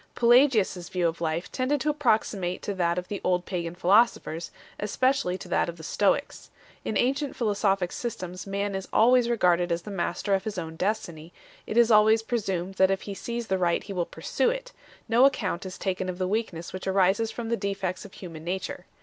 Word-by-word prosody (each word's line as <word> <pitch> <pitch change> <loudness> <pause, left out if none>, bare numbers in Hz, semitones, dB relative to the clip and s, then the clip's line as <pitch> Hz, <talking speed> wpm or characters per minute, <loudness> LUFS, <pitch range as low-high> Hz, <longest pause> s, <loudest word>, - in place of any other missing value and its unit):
Pelagius 240 -4 +4
s 175 -1 -8
view 180 -2 +1
of 165 +1 -4
life 165 +1 -2
tended 270 +3 0
to 305 - +1
approximate 215 - 0
to 205 - -2
that 175 -2 0
of 180 0 -3
the 205 - -5
old 180 -1 +1
pagan 175 -2 -4
philosophers, 180 -3 +2 0.3
especially 210 -2 +1
to - - -10
that - - +1
of 170 - -7
the 160 - -11
Stoics. 210 - 0 0.3
In 215 - -1
ancient 275 +3 0
philosophic 200 -5 +1
systems 185 -5 -5
man 200 +1 -2
is 190 0 -4
always 240 +1 +4
regarded 180 -6 +2
as 170 0 -1
the 210 - -7
master 195 +1 -1
of 190 -1 +1
his 215 -3 -5
own 160 -2 -5
destiny; 170 -4 -3 0.4
it 220 - -3
is 235 -1 +5
always 220 +1 +5
presumed 195 -6 -2
that 190 0 +5
if 195 0 -1
he 200 - -5
sees 235 +4 -4
the 190 -3 -1
right 175 -1 +1
he 200 - -7
will 175 -2 -1
pursue 485 - 0
it; - - -4 0.4
no 235 +2 +4
account 195 -9 0
is 185 - -8
taken 190 -1 -2
of 180 - -4
the 185 0 -1
weakness 185 -5 -3
which 185 0 -6
arises 195 +3 +2
from 230 0 -5
the 235 - +2
defects 195 -4 -3
of 205 - -12
human 165 -4 -9
nature. 185 +1 -4
195 Hz, 205 wpm, -27 LUFS, 180-225 Hz, 0.4 s, is